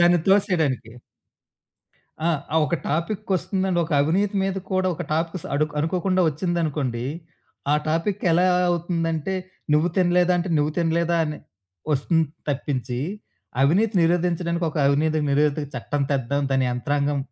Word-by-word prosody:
దాన్ని 175 0 +5
తోసేయడానికి. 165 - +2 1.4
ఆ! - - +3 0.3
అవ్ 160 - +4
ఒక 170 - 0
టాపికొస్తుందండి. 185 +2 -1
ఒక 160 - -6
అవినీతి 195 +7 +1
మీద 195 0 0 0.2
కూడా 185 0 +1
ఒక 175 - -5
టాపిక్స్ 165 +2 -2
అడు 150 +2 +3
అనుకోకుండా 185 +4 +1
ఒచ్చిందనుకోండి, 150 -7 -1 0.7
ఆ - - +5
టాపిక్ 175 +6 0
ఎలా 180 +2 +4 0.2
అవుతుందంటే 170 0 -1 0.4
నువ్వు 155 +3 +3
తినలేదంటే, 180 0 +3
నువ్వు 150 +1 +1
తినలేదా? 170 0 +1
అని 150 0 -4 0.5
ఒస్తుంది 160 +4 +2 0.2
తప్పించి 130 -3 -2 0.6
అవినీతి 195 +10 +3
నిరోధించడానికి 170 0 +1
ఒక - - -10
అవినీతి 155 +3 +2
నిరోధక 145 +1 +1
చట్టం 140 +4 -2
తెద్దాం 140 +1 0
దాని 135 -1 +2
యంత్రాంగం 145 +3 0
165 Hz, 120 wpm, -23 LUFS, 145-180 Hz, 1.4 s, దాన్ని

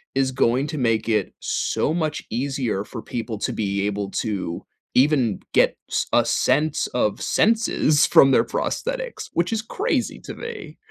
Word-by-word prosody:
is 135 -1 +2
going 130 +1 +2
to 155 0 -5
make 115 -3 +1
it 105 -4 +1
so 155 - -1
much 155 -3 -2
easier 125 -4 -1
for 115 +1 -8
people 115 -2 -4
to - - -2
be 100 -2 -1
able 100 -1 -2
to 95 -5 -3 0.3
even 130 -7 +3
get - - +3
s - - 0
a - - +4
sense 150 +1 +1
of 105 -4 -1
senses 215 -9 +3
from 135 - +6
their - - +5
prosthetics, - - -3
which 175 +6 0
is 220 - 0
crazy 400 - -2
to - - -8
me. 460 -2 -8
130 Hz, 160 wpm, -23 LUFS, 110-160 Hz, 0.3 s, from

